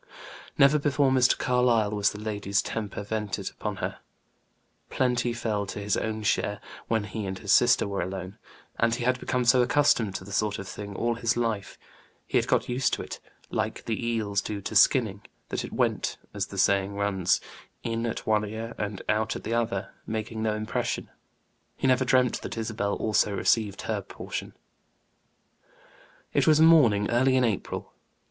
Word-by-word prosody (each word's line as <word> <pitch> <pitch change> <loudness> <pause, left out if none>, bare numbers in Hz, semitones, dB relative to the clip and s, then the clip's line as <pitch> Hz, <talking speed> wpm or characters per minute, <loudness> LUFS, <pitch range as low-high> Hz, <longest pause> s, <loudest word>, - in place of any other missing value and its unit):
Never 140 +2 +6
before 140 -1 +2
Mr. 130 -1 +4
Carlyle 125 -4 +2
was 105 -1 +2
the 105 - -8
lady's 100 -2 -1
temper 105 -2 -4
vented 105 -2 -3
upon - - -4
her; - - -4 0.9
plenty 125 -1 +1
fell 110 -4 -2
to 100 - -5
his 100 -1 0
own 110 0 -2
share, 105 -1 0 0.3
when 110 -2 +1
he 105 -1 -5
and 95 0 -4
his 100 - +1
sister 120 -3 +5
were 100 0 -2
alone; 95 +3 -5 0.4
and 115 0 +3
he 120 - -4
had 125 +1 +1
become 125 -1 -1
so 125 +1 +6
accustomed 120 -6 +2
to - - -4
the 100 - -11
sort 105 0 0
of 100 - -7
thing 100 0 -7
all 120 +3 0
his 115 0 0
life 115 -4 -2 0.5
had - - +2
got - - +2
used 125 +1 0
to - - -6
it, - - -7 0.3
like 110 0 -2
the 115 +1 -2
eels 105 -4 0
do 105 -1 -4
to 105 +2 -6
skinning 110 -3 +4 0.3
that - - -2
it - - -7
went, - - 0 0.2
as 100 -2 -2
the 100 - -9
saying 100 +1 +2
runs, 100 -3 +1 0.4
in 115 0 -1
at 115 - -4
one 105 -1 +2
ear 110 +2 -5
and 105 -2 -4
out 110 +1 +1
at - - -6
the 115 - -3
other, 110 -4 -1 0.2
making 110 0 -3
no 110 -1 0
impression. 110 0 -3 0.7
He - - -3
never 130 0 +3
dreamt 125 -1 +2
that - - -6
Isabel 110 -2 -2
also 105 -1 +1
received 105 -1 +1
her - - -2
portion. - - -7 1.8
It - - +2
was 155 -1 +6
a - - +7
morning 125 -11 +6
early 130 +2 +3
in 130 - +3
April. 110 -5 -2
110 Hz, 180 wpm, -27 LUFS, 100-120 Hz, 1.8 s, a